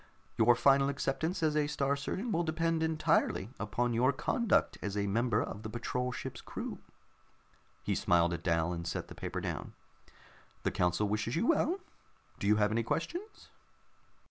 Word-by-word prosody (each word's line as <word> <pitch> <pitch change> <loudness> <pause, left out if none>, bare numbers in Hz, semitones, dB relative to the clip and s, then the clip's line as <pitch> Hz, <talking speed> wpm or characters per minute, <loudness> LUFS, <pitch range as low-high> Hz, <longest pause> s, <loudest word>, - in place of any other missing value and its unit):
Your 120 +2 +5
final 135 +2 +4
acceptance 140 +5 -1
as 155 -1 +2
a 150 -1 +2
Star 140 -1 0
Surgeon 190 - -3
will 170 - +2
depend 165 0 0
entirely 155 -9 +1
upon 120 +3 0
your 125 +4 +4
conduct 235 - +1
as 105 -1 -3
a 100 - +1
member 115 +2 +1
of 105 - -6
the 110 - -6
patrol 125 +2 -2
ship's - - -6
crew." - - -6 1.0
He - - 0
smiled 85 0 +3
at 80 - -4
Dal, 85 0 +1
and 85 0 -5
set - - -3
the - - -8
paper - - -4
down. - - -4 0.9
"The - - +1
council 90 +4 +1
wishes 105 +4 -1
you 170 - +1
well. 335 +5 +2 0.6
Do 100 - -1
you 105 - +5
have 105 0 +2
any 115 +2 +1
questions?" 345 - -4
125 Hz, 170 wpm, -32 LUFS, 105-160 Hz, 1.0 s, Your